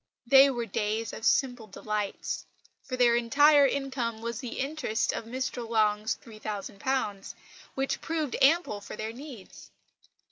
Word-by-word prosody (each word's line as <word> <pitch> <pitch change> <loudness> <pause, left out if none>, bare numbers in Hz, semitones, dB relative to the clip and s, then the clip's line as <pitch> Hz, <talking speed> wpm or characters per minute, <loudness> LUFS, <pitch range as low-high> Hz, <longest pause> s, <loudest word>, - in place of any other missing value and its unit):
They 270 +3 +7
were 240 -3 -2
days 215 +1 -2
of - - -8
simple 245 -4 +1
delights; 210 0 -4 0.4
for 255 -1 -5
their 240 -1 +5
entire 280 +5 +5
income 260 -5 -2
was 235 0 -4
the 250 -3 -6
interest 270 -6 -1
of - - -4
Mr 245 -1 -4
Long's 215 -1 +1
£3000, 215 0 -4 0.4
which 270 0 -1
proved 315 -5 -2
ample 275 -7 +3
for - - -8
their 220 +1 -5
needs. 255 -5 -11
235 Hz, 135 wpm, -28 LUFS, 215-270 Hz, 0.4 s, They